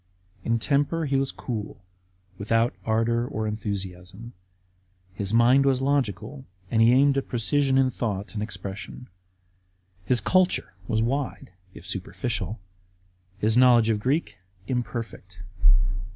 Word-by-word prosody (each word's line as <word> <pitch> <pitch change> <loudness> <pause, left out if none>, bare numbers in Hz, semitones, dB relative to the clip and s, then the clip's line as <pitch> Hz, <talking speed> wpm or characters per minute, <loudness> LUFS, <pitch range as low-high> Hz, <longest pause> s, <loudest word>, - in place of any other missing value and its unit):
In 115 0 +1
temj)er 145 +6 0
he 140 - 0
was 135 0 +1
cool, 105 -6 -6 0.5
without 115 +3 +1
ardour 115 +2 +1
or 110 -2 -3
enthusiasm. 100 0 -5 0.8
His 100 +1 -3
mind 120 +4 +5
was 135 -2 +2
logical 135 -2 -1 0.3
and 110 - +3
he 115 +1 +6
aimed 135 +2 +4
at - - -7
precision 135 +3 +1
in 130 -1 +3
thought 105 -5 -3
and 105 - -3
expression. 100 +3 -7 0.9
His 120 +6 +2
culture 185 - +1
was 110 0 +1
wide, 130 -4 -3 0.2
if 85 - -12
superficial; 100 +4 -3 0.8
his 110 +3 +1
knowledge 120 -3 +6
of 105 - 0
Greek 130 - -1 0.3
imperfect. 115 -7 -5
115 Hz, 125 wpm, -25 LUFS, 105-130 Hz, 0.9 s, he